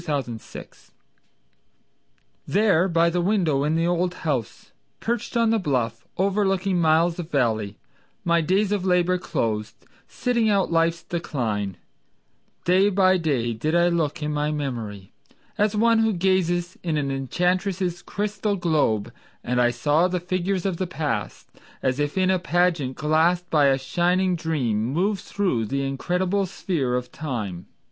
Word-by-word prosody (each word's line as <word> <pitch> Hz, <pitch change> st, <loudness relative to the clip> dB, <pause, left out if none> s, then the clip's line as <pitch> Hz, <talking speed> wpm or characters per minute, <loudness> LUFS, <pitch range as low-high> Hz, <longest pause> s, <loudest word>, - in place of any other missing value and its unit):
Herndon 135 Hz, -6 st, -2 dB, 2.1 s
There 195 Hz, -3 st, +3 dB
by 170 Hz, -1 st, +2 dB
the 175 Hz, +1 st, 0 dB
window 170 Hz, -8 st, +1 dB
in 150 Hz, +2 st, +1 dB
the 165 Hz, +1 st, +1 dB
old 175 Hz, +1 st, 0 dB
house 135 Hz, -8 st, -3 dB, 0.3 s
Perched 235 Hz, 0 st, -2 dB
on 230 Hz, -1 st, +3 dB
the 225 Hz, -, +2 dB
bluff, 120 Hz, -, -2 dB
overlooking 195 Hz, -1 st, +1 dB
miles 165 Hz, +2 st, +3 dB
of 170 Hz, -2 st, -5 dB
valley, 110 Hz, -8 st, 0 dB, 0.5 s
My 170 Hz, 0 st, +3 dB
days 195 Hz, +5 st, +1 dB
of 205 Hz, -3 st, 0 dB
labor 180 Hz, -1 st, +2 dB
closed, 110 Hz, -9 st, -2 dB, 0.3 s
sitting 235 Hz, -3 st, 0 dB
out 195 Hz, -4 st, +2 dB
life's 165 Hz, 0 st, +1 dB
decline, 110 Hz, -, -3 dB, 0.9 s
Day 185 Hz, +3 st, +4 dB
by 190 Hz, -1 st, +4 dB
day 135 Hz, -9 st, 0 dB
did 155 Hz, +9 st, -1 dB
I 175 Hz, 0 st, +4 dB
look 155 Hz, -3 st, -1 dB
in 150 Hz, 0 st, -2 dB
my 150 Hz, 0 st, 0 dB
memory, 115 Hz, -10 st, -4 dB, 0.4 s
As 210 Hz, +1 st, +1 dB
one 230 Hz, +1 st, +4 dB
who 225 Hz, -1 st, +2 dB
gazes 175 Hz, -1 st, 0 dB
in 165 Hz, -3 st, -1 dB
an 140 Hz, -2 st, -1 dB
enchantress' 180 Hz, -, -1 dB
crystal 205 Hz, 0 st, -2 dB
globe, 150 Hz, -, 0 dB, 0.3 s
And 125 Hz, 0 st, +1 dB
I 120 Hz, -, +4 dB
saw 145 Hz, +8 st, +2 dB
the 180 Hz, 0 st, -1 dB
figures 185 Hz, +1 st, -2 dB
of 190 Hz, -3 st, -1 dB
the 185 Hz, -, -2 dB
past 145 Hz, -11 st, -3 dB, 0.4 s
As 130 Hz, +1 st, 0 dB
if 145 Hz, +4 st, -1 dB
in 185 Hz, 0 st, +3 dB
a 185 Hz, -, +2 dB
pageant 170 Hz, -7 st, +1 dB
glassed 165 Hz, +4 st, +2 dB
by 150 Hz, -3 st, +4 dB
a 135 Hz, -1 st, +3 dB
shining 175 Hz, +7 st, +1 dB
dream, 140 Hz, -10 st, -1 dB
Move 180 Hz, -, 0 dB
through 180 Hz, -, -1 dB
the 140 Hz, +4 st, -1 dB
incredible 180 Hz, +8 st, -1 dB
sphere 150 Hz, -9 st, -2 dB
of 125 Hz, 0 st, -3 dB
time. 105 Hz, -, -5 dB
170 Hz, 150 wpm, -24 LUFS, 135-185 Hz, 2.1 s, Day